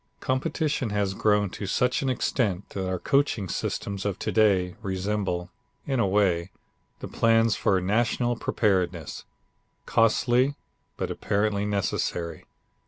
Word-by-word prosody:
Competition 130 0 -1
has 100 -2 0
grown 105 -1 +2
to 100 - -6
such 125 +5 +1
an 135 - 0
extent 105 -6 -1
that 95 -1 -3
our 95 - -1
coaching 135 -3 +1
systems 100 +3 -3
of 100 -2 -2
to - - -3
day 95 -5 +3
resemble, 95 -2 -2 0.3
in 135 -3 0
a 100 - +3
way, 95 -3 +2 0.5
the - - -5
plans 115 -1 +3
for 95 - +2
national 120 +5 +1
preparedness 95 -8 -1 0.6
costly, 120 +4 +3 0.4
but - - -2
apparently 100 0 0
necessary. 85 -4 -2
105 Hz, 125 wpm, -26 LUFS, 95-115 Hz, 0.6 s, day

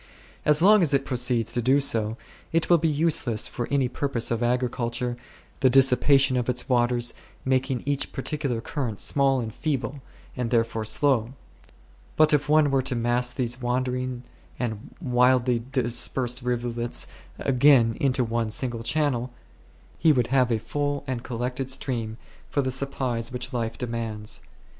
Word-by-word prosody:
As 150 +2 +4
long 210 +1 +7
as 150 -5 +2
it 135 0 0
proceeds 120 -3 0 0.3
so, 110 -2 0 0.3
it 165 +1 0
will 170 - +6
be 165 - +1
useless 145 -7 +1
for 120 - -4
any 140 -2 +2
purpose 125 -2 -2
of 115 0 -1
agriculture, 120 0 -1 0.4
the 130 - +4
dissipation 135 +1 +4
of 125 0 -1
its 125 0 -1
waters 120 -1 +2 0.3
making 130 -1 0
each 140 -1 -1
par 135 - -5
ticular 140 -7 -2
current 120 -9 -4
small 135 -2 +2
and 110 -3 -4
feeble, 140 -2 -3 0.3
and 125 -2 -2
therefore 115 -2 0
slow. 120 +1 +1 0.8
But 155 0 +4
if 145 0 +1
one 150 -2 +4
were 135 -1 +2
to 130 -1 -3
mass 120 +1 +1
these 125 0 -2
wandering 125 0 -2 0.3
and 110 -4 -5
widely 125 -4 +2
dispersed 125 0 0
rivulets 120 -1 -1 0.3
again 130 -4 +4
into 130 -2 +2
one 115 -1 -1
single 120 +1 -2
channel, 125 -1 0 0.7
he 160 - +5
would 125 -5 +2
have 130 -2 +3
a 115 - +2
full 145 +5 -3
and 130 -3 -3
col 120 - -5
lected 125 +2 -3
stream 115 -4 -2 0.3
for 140 - 0
the 130 - -1
supplies 130 -3 -3
which 125 0 -5
life 115 -2 -2
de 125 - -3
mands. 110 -3 -4
125 Hz, 155 wpm, -25 LUFS, 120-135 Hz, 0.8 s, long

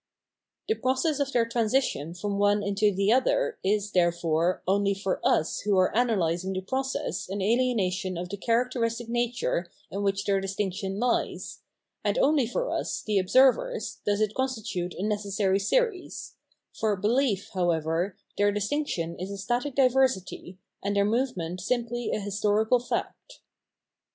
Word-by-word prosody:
The 440 - +3
process 275 - 0
of 280 -1 0
their 235 -3 +2
transition 230 - 0
from 200 +2 -3
one 205 0 +3
into 200 +1 +2
the 200 +3 +2
other - - +1
is, 205 +1 0
therefore, 170 -1 +1
only 200 +1 +2
for 195 -1 -2
us 160 - +2
[who 205 -1 +1
are 185 0 +4
analysing 190 -6 +1
the 185 - -2
process] 260 -4 -3
an 195 - -3
ahenation 195 -5 0
of 180 - -4
the 200 - -5
characteristic 230 +1 0
nature 240 -7 -1 0.2
in 200 - -3
which 195 -1 0
their 195 -1 +2
distinction 195 0 -3
hes, 245 0 -1 0.4
and - - 0
only 295 - +3
for - - -2
us, - - -2
the 210 -2 +2
observers, 265 - +2
does 205 0 0
it 215 -1 +1
constitute 220 -9 -3
a 185 - -4
necessary 200 -2 0
series; 425 - -1 0.4
for 215 -2 0
belief, 210 +1 0
however, 175 0 0 0.2
their 205 0 +4
distinction 205 - -2
is 185 +2 -4
a 200 - -5
static 245 +7 -2
diversity, 255 -9 +1 0.2
and 200 +1 -1
their 200 0 +3
movement 200 -7 -1
simply 240 +2 -1
a - - -1
historical 210 +3 +1
fact. 245 - -5
205 Hz, 145 wpm, -27 LUFS, 190-245 Hz, 0.4 s, are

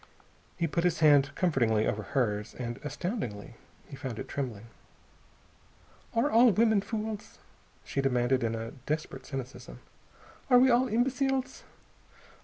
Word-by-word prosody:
He 170 - 0
put 170 +2 -1
his 175 -2 +1
hand 145 -3 +6
comfortingly 115 -11 +2
over 105 - -1
hers. 105 -4 -2
And, 120 0 -5
astoundingly, 145 - -4 0.3
he - - -9
found 130 -4 -6
it - - -6
trembling. 120 -6 -4 1.5
"Are 235 +6 +2
all 240 +2 +7
women 220 0 +3
fools?" 215 0 -5 0.5
she 140 - -1
demanded 130 -1 +1
in 115 0 0
a 115 0 -5 0.2
desperate 155 +1 -3
cynicism. 135 -2 -7 0.7
"Are 250 - +7
we 260 +1 +6
all 245 +2 +4
imbeciles? 260 +3 -1
145 Hz, 130 wpm, -29 LUFS, -, 1.5 s, all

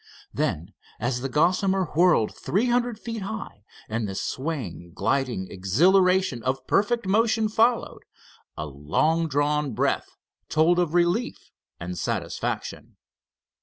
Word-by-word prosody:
Then, 85 +7 -2 0.3
as 120 +2 -1
the 135 - -3
Gossamer 185 +6 +2
whirled 170 -9 +3
three 205 +6 0
hundred 240 -1 +1
feet 230 0 -6
high, 200 - -6 0.2
and 110 0 -2
the 95 - -5
swaying, 115 - -4
gliding 115 -1 0
exhilaration 180 - +3
of 130 +2 -2
perfect 235 - +1
motion 220 +2 +2
followed, 225 +3 +1 0.6
a 75 - -3
long 80 - 0
drawn 145 -1 0
breath - - -1 0.3
told 165 +3 +3
of 175 -2 0
relief 175 +7 0 0.3
and 90 0 -5
satisfaction. - - -4
160 Hz, 120 wpm, -25 LUFS, -, 0.6 s, whirled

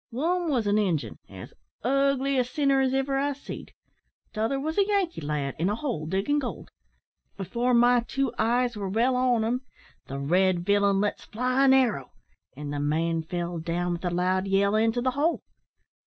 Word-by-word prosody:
One 335 +8 -1
wos 245 -7 +1
an 205 +1 +2
Injun, 175 -8 -1
as - - -10 0.3
ugly 275 +1 +1
a - - +3
sinner 275 +1 +1
as 260 -1 +1
iver 270 0 0
I 285 +1 0
seed; 280 - -9 0.6
t'other 225 +5 -1
wos 315 +6 -2
a 400 - +3
Yankee 395 - 0
lad, 145 -2 -3
in 175 +4 +1
a 210 - 0
hole 225 - -3
diggin' 195 - 0
gold. 255 -4 -6 0.7
Before 235 +6 0
my 245 +1 +5
two 270 -3 -1
eyes 240 +2 +1
were 200 -2 -4
well 235 +6 +2
on 250 -3 +2
them, 240 +3 -1 0.5
the 135 - -5
red 175 +5 +1
villain 200 -1 +3
lets 205 - -2
fly 255 +4 +1
an 265 - +6
arrow, 230 - +1 0.4
and 145 0 -5
the 145 - -2
man 160 +3 0
fell 175 +1 -4
down 175 +2 -2
with 170 - -6
a 180 - 0
loud 185 +2 0
yell 200 +1 +2
into 225 +2 +2
the 255 - +2
hole. 295 +6 0
225 Hz, 185 wpm, -26 LUFS, 180-270 Hz, 0.7 s, an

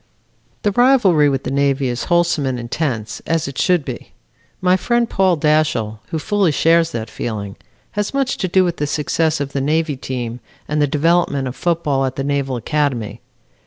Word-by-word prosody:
"The 205 - +2
rivalry 200 - +4
with 135 -1 -1
the - - -3
Navy 140 -1 +1
is 120 0 -3
wholesome 170 -5 +2
and 130 -2 -2
intense, 120 -3 -3
as 165 -3 0
it 140 -1 -6
should 180 -6 +2
be. 125 -3 -7 0.5
My 185 0 +3
friend, 235 +5 +1
Paul 190 -4 +2
Dashiell, 150 -8 +1
who 160 - -3
fully 200 +1 +1
shares 165 +2 +3
that 115 -1 -4
feeling, 105 -3 -5 0.4
has 210 -1 -2
much 275 -2 0
to 185 - -1
do 185 +1 +3
with 175 -1 -1
the 145 - -1
success 155 +2 0
of 140 -1 -4
the 140 - -1
Navy 155 +1 0
team, 125 -2 -5 0.3
and 150 0 0
the 145 - +3
development 150 -2 +1
of 125 - -5
football 160 -6 0
at 130 0 -3
the 135 - -3
Naval 140 -2 -1
Academy. 120 -5 -2
150 Hz, 185 wpm, -19 LUFS, 130-175 Hz, 0.5 s, rivalry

